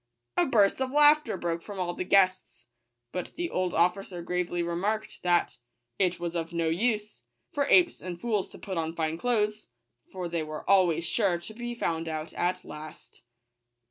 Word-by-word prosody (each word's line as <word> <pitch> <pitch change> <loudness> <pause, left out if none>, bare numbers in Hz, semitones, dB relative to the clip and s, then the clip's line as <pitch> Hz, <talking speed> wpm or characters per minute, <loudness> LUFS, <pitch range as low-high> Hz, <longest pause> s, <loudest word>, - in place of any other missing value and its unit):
A - - +2
hurst 205 +2 +4
of 260 - 0
laughter 295 -4 +5
broke 170 -1 -2
from 200 0 -8
all 175 -1 -1
the 185 - -3
guests: 185 -9 +2 0.5
but 180 - -5
the 345 0 -3
old 185 -1 -1
officer 180 +1 +1
gravely 175 0 -1
remarked, 200 +6 -2
that 175 -1 +2 0.2
" 120 0 -52
it 185 -2 +1
was 170 0 -4
of 165 0 -2
no 165 -1 0
use 210 +4 -1 0.3
for 290 -4 0
apes 355 -2 +5
and 175 -2 -6
fools 215 -4 -1
to - - -13
put 190 -4 -4
on 165 0 -3
fine 160 0 -1
clothes; 215 -3 0 0.4
for 185 -2 -4
they 170 -1 -2
were 155 0 -6
always 180 -4 +4
sure 190 0 +1
to 220 - -9
be 240 +1 -5
found 165 -7 -2
out 155 0 -4
at 180 +1 -1
last." 155 0 -10
180 Hz, 180 wpm, -28 LUFS, 170-210 Hz, 0.5 s, laughter